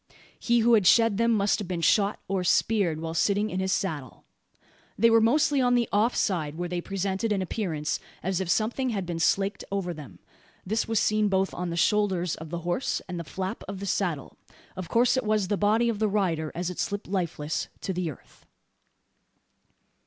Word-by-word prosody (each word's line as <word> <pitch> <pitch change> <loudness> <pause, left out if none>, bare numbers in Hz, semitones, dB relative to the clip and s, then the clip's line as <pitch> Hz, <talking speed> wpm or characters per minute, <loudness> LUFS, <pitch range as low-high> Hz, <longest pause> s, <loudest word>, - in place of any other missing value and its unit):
He 235 -1 +2
who 235 +1 +4
had 205 -5 +5
shed 225 -1 +5
them 230 +1 +2
must 205 -1 +2
have 205 - -5
been 175 -2 -3
shot, 200 +5 +2
or 190 -1 -1
speared, 180 -3 +2
while 165 0 -4
sitting 205 +5 +1
in 185 - -2
his 190 0 -1
saddle. 155 -10 -3 0.7
They 230 0 +5
were 225 0 +6
mostly 280 +4 +3
on 245 -1 +3
the 240 -1 +2
off 220 +4 +2
side; 160 -7 -1
where 175 +2 -3
they 175 0 -3
presented 195 +3 -2
an 195 -2 +1
appearance, 170 -6 -2 0.2
as 190 0 -1
if 185 - -4
something 240 +6 0
had 200 -5 -2
been 170 -1 -4
slaked 195 +4 +1
over 190 -3 -2
them. 135 - -11 0.5
This 220 +4 -1
was 225 -1 +1
seen 215 0 +2
both 190 -1 0
on 180 0 -3
the 170 - -4
shoulders 190 -3 +1
of 160 0 -7
the 170 +1 -4
horse, 175 +10 -1
and 180 -2 -5
the - - -4
flap 190 +6 -5
of 195 -1 -6
the 200 - -5
saddle. 175 -7 -2 0.4
Of 185 -2 -6
course 240 +5 +3
it 260 - 0
was 215 -3 0
the 205 - +2
body 215 +4 +2
of 225 -3 -1
the 220 - +2
rider 170 -7 0
as 175 +1 -2
it 180 - -9
slipped 205 +1 -3
lifeless 170 -5 -2
to 190 - -3
the 180 -2 -2
earth. 145 - -14
195 Hz, 205 wpm, -27 LUFS, 175-215 Hz, 0.7 s, were